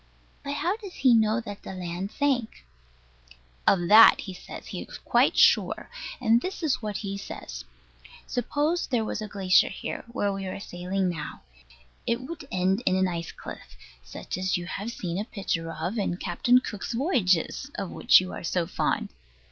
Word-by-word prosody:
But 280 Hz, 0 st, -3 dB
how 350 Hz, +8 st, 0 dB
does 400 Hz, -5 st, -10 dB
he 255 Hz, -3 st, +4 dB
know 220 Hz, 0 st, +3 dB
that 205 Hz, -3 st, -8 dB
the 190 Hz, -, -8 dB
land 180 Hz, +1 st, -4 dB
sank? 265 Hz, -6 st, -1 dB, 1.0 s
Of 175 Hz, -3 st, +4 dB
that, 220 Hz, +2 st, +9 dB
he 190 Hz, -, -7 dB
says, 180 Hz, -, -10 dB
he -, -, -6 dB
is -, -, -9 dB
quite -, -, +2 dB
certain; -, -, +4 dB, 0.3 s
and 230 Hz, -1 st, +4 dB
this 370 Hz, +2 st, -5 dB
is 300 Hz, -5 st, +1 dB
what 210 Hz, -3 st, -3 dB
he 200 Hz, 0 st, -3 dB
says. -, -, -8 dB, 0.6 s
Suppose 295 Hz, +7 st, 0 dB
there 240 Hz, -4 st, 0 dB
was 215 Hz, -, -3 dB
a 215 Hz, -, -4 dB
glacier 195 Hz, -3 st, +3 dB
here, -, -, -5 dB
where 205 Hz, -5 st, 0 dB
we 195 Hz, -1 st, -4 dB
are 185 Hz, -, -5 dB
sailing 185 Hz, 0 st, -2 dB
now: 165 Hz, -4 st, -5 dB, 0.6 s
it 235 Hz, -, +1 dB
would 290 Hz, +1 st, -8 dB
end 185 Hz, +3 st, +1 dB
in 185 Hz, -, +4 dB
an 190 Hz, 0 st, +3 dB
ice 170 Hz, -2 st, -4 dB
cliff, 65 Hz, 0 st, -10 dB, 0.3 s
such 65 Hz, -, -6 dB
as 185 Hz, 0 st, +1 dB
you 175 Hz, -, -5 dB
have 200 Hz, +6 st, -4 dB
seen 180 Hz, -5 st, -4 dB
a -, -, -1 dB
picture 185 Hz, -7 st, -3 dB
of 170 Hz, +8 st, -3 dB
in 175 Hz, -3 st, -1 dB
Captain 215 Hz, +8 st, +3 dB
Cook's 210 Hz, -2 st, -5 dB
Voyages, 230 Hz, -, +1 dB
of 195 Hz, -3 st, -4 dB
which -, -, +6 dB
you 185 Hz, 0 st, -5 dB
are -, -, -7 dB
so 170 Hz, +1 st, 0 dB
fond. -, -, -1 dB
200 Hz, 180 wpm, -27 LUFS, 185-245 Hz, 1.0 s, that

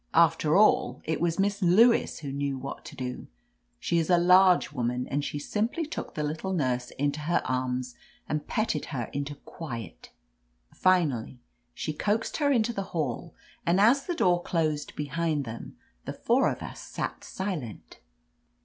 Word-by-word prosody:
After 165 Hz, -1 st, +4 dB
all, 165 Hz, -11 st, +4 dB
it 160 Hz, 0 st, -2 dB
was 170 Hz, -1 st, +1 dB
Miss 200 Hz, +1 st, 0 dB
Lewis 205 Hz, +3 st, +4 dB
who 140 Hz, -3 st, -5 dB
knew 140 Hz, 0 st, -2 dB
what 135 Hz, +1 st, -7 dB
to 150 Hz, -1 st, -9 dB
do. 125 Hz, -2 st, -5 dB, 0.5 s
She 170 Hz, -, +1 dB
is 165 Hz, -, -1 dB
a 175 Hz, -, +6 dB
large 180 Hz, 0 st, +5 dB
woman, 125 Hz, -2 st, -2 dB
and 145 Hz, +1 st, -1 dB
she 145 Hz, -, -3 dB
simply 220 Hz, -, -1 dB
took 305 Hz, -, -6 dB
the 150 Hz, -, -1 dB
little 160 Hz, +6 st, -2 dB
nurse 125 Hz, -7 st, 0 dB
into 145 Hz, +1 st, 0 dB
her 155 Hz, +3 st, 0 dB
arms 125 Hz, -1 st, -2 dB, 0.3 s
and 150 Hz, -1 st, -2 dB
petted 215 Hz, -9 st, -1 dB
her 125 Hz, -6 st, -4 dB
into 140 Hz, +1 st, -3 dB
quiet. 120 Hz, -, -8 dB, 0.6 s
Finally^ 150 Hz, -11 st, +1 dB, 0.4 s
she 155 Hz, -, -3 dB
coaxed 210 Hz, +8 st, -1 dB
her 285 Hz, -2 st, +2 dB
into 235 Hz, -2 st, +2 dB
the 200 Hz, -, -2 dB, 0.2 s
hall, 155 Hz, +2 st, -3 dB, 0.3 s
and 175 Hz, +3 st, +2 dB
as 245 Hz, +7 st, +4 dB
the 350 Hz, -, -1 dB
door 175 Hz, -, +3 dB
closed 155 Hz, -4 st, -1 dB
behind 150 Hz, 0 st, -1 dB
them, 115 Hz, 0 st, -8 dB, 0.3 s
the -, -, -4 dB
four -, -, +2 dB
of -, -, -5 dB
us -, -, -8 dB
sat' -, -, -5 dB
silent. 175 Hz, -, -5 dB
155 Hz, 165 wpm, -28 LUFS, 135-185 Hz, 0.6 s, a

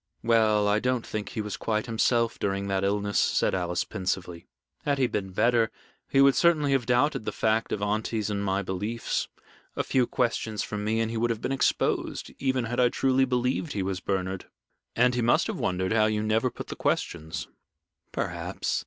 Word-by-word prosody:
"Well, 110 Hz, -2 st, +3 dB
I 105 Hz, +1 st, +3 dB
don't 125 Hz, 0 st, 0 dB
think 105 Hz, -1 st, -4 dB
he 110 Hz, -, -3 dB
was 105 Hz, -1 st, -4 dB
quite 110 Hz, -1 st, -1 dB
himself 115 Hz, 0 st, +1 dB
during 100 Hz, 0 st, -1 dB
that 95 Hz, 0 st, 0 dB
illness," 100 Hz, 0 st, +1 dB
said -, -, +2 dB
Alice, 90 Hz, -2 st, 0 dB
pensively. 90 Hz, -4 st, -4 dB, 0.4 s
"Had 145 Hz, -1 st, +1 dB
he 135 Hz, -, +3 dB
been 100 Hz, -5 st, -2 dB
better, 115 Hz, +3 st, +3 dB, 0.4 s
he 135 Hz, -, +4 dB
would 140 Hz, 0 st, +7 dB
certainly 150 Hz, 0 st, +3 dB
have 135 Hz, -4 st, +1 dB
doubted 125 Hz, 0 st, +2 dB
the -, -, -2 dB
fact 110 Hz, +1 st, 0 dB
of 105 Hz, -, -2 dB
aunty's 105 Hz, 0 st, -1 dB
and 100 Hz, -1 st, -1 dB
my 100 Hz, 0 st, 0 dB
beliefs. 105 Hz, +5 st, -2 dB, 0.5 s
A -, -, 0 dB
few 125 Hz, -2 st, +2 dB
questions 115 Hz, -3 st, -1 dB
from 105 Hz, -1 st, -4 dB
me, 110 Hz, +2 st, 0 dB
and 115 Hz, 0 st, -1 dB
he 115 Hz, -, -3 dB
would 120 Hz, +1 st, +1 dB
have 115 Hz, -2 st, -1 dB
been -, -, -3 dB
exposed, 135 Hz, -, 0 dB
even 130 Hz, -2 st, +1 dB
had 120 Hz, +2 st, -3 dB
I 125 Hz, -1 st, +5 dB
truly 130 Hz, +1 st, +2 dB
believed 125 Hz, +4 st, -1 dB
he 100 Hz, -, -1 dB
was 95 Hz, -1 st, -2 dB
Bernard." 95 Hz, -1 st, -3 dB, 0.5 s
"And 125 Hz, +1 st, +4 dB
he 120 Hz, -, 0 dB
must 120 Hz, +1 st, +3 dB
have -, -, -4 dB
wondered 95 Hz, +2 st, 0 dB
how 110 Hz, -1 st, +4 dB
you 105 Hz, -1 st, 0 dB
never 110 Hz, +3 st, +2 dB
put -, -, -9 dB
the -, -, -4 dB
questions." 80 Hz, -1 st, -2 dB, 0.6 s
"Perhaps. -, -, -2 dB
110 Hz, 195 wpm, -27 LUFS, 100-125 Hz, 0.6 s, would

